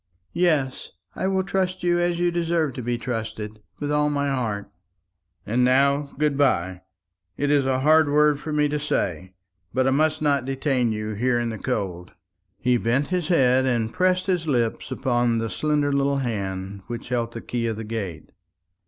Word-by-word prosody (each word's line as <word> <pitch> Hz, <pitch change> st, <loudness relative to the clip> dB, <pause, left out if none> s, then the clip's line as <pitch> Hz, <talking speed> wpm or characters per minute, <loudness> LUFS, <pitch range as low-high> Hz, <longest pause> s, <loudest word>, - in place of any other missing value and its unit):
"Yes; 155 Hz, -7 st, +1 dB, 0.3 s
I 190 Hz, -, -1 dB
will 190 Hz, -1 st, +1 dB
trust 185 Hz, -1 st, -1 dB
you 175 Hz, 0 st, +2 dB
as 175 Hz, 0 st, 0 dB
you 175 Hz, 0 st, +2 dB
deserve 170 Hz, -4 st, 0 dB
to 125 Hz, -, -5 dB
be 120 Hz, 0 st, -1 dB
trusted, 110 Hz, -3 st, -5 dB, 0.2 s
with 145 Hz, 0 st, -3 dB
all 150 Hz, 0 st, +2 dB
my 145 Hz, -1 st, 0 dB
heart." 110 Hz, -7 st, -2 dB, 0.8 s
"And 120 Hz, +4 st, +1 dB
now, 140 Hz, +3 st, +2 dB
good 150 Hz, -1 st, +1 dB
bye. 95 Hz, -10 st, +1 dB, 0.6 s
It 145 Hz, 0 st, 0 dB
is 140 Hz, -2 st, +3 dB
a 130 Hz, 0 st, +1 dB
hard 155 Hz, +1 st, +5 dB
word 150 Hz, 0 st, +4 dB
for 155 Hz, -, -6 dB
me 150 Hz, 0 st, +2 dB
to 150 Hz, 0 st, -1 dB
say; 95 Hz, -, -2 dB, 0.4 s
but 130 Hz, 0 st, +2 dB
I 135 Hz, -, +3 dB
must 155 Hz, +3 st, +2 dB
not 145 Hz, -3 st, +2 dB
detain 135 Hz, -2 st, 0 dB
you 105 Hz, 0 st, -3 dB
here 120 Hz, +3 st, +1 dB
in 120 Hz, -1 st, -1 dB
the 110 Hz, -, -5 dB
cold." 95 Hz, -8 st, -3 dB, 0.4 s
He 125 Hz, +3 st, +2 dB
bent 120 Hz, +5 st, 0 dB
his 180 Hz, -3 st, -1 dB
head, 130 Hz, -6 st, +3 dB
and 115 Hz, -3 st, 0 dB
pressed 185 Hz, 0 st, +2 dB
his 180 Hz, -4 st, 0 dB
lips 120 Hz, -5 st, 0 dB
upon 120 Hz, -3 st, +1 dB
the 115 Hz, -1 st, -2 dB
slender 150 Hz, -2 st, 0 dB
little 140 Hz, 0 st, +1 dB
hand 100 Hz, -5 st, -3 dB
which 120 Hz, -1 st, -6 dB
held 120 Hz, -2 st, -1 dB
the 115 Hz, -, -6 dB
key 120 Hz, -1 st, -2 dB
of 110 Hz, -, -1 dB
the 110 Hz, -, -5 dB
gate. 105 Hz, -7 st, -5 dB
130 Hz, 185 wpm, -24 LUFS, 115-150 Hz, 0.8 s, hard